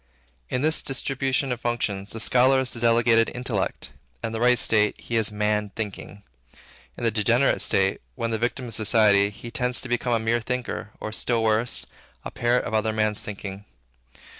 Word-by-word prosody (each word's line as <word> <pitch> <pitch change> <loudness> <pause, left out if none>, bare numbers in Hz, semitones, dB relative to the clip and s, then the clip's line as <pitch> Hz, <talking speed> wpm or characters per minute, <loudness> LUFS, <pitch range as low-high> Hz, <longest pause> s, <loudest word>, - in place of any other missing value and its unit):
In 125 - -1
this 155 +1 +2
distribution 135 0 -1
of 120 -1 -3
functions, 105 -4 -2
the 115 - -6
scholar 130 +3 +4
is 130 -2 -1
the 115 - -5
delegated 115 -1 +4
intellect. 120 -6 -3 0.3
In 110 - -2
the 110 - -4
right 125 +1 +4
state, 105 -2 +2
he 120 - -5
is, 110 -2 +3
Man 105 0 0
Thinking. 100 -1 -6 0.7
In - - -7
the 115 - +2
degenerate 115 +5 +2
state, 95 0 +1
when 115 0 -2
the 110 - -1
victim 125 +2 -2
of - - -7
society, 105 -2 +3
he 105 +3 -9
tends 125 0 0
to - - -7
become 120 0 0
a - - +3
mere 115 +1 0
thinker, 125 -2 -4
or, 110 - -5
still 115 +1 0
worse, 110 +2 +1 0.4
the - - -6
parrot 120 +1 +1
of 120 - -5
other 110 0 +1
men's 110 -1 0
thinking. 100 -1 -7
115 Hz, 185 wpm, -24 LUFS, 105-125 Hz, 0.7 s, scholar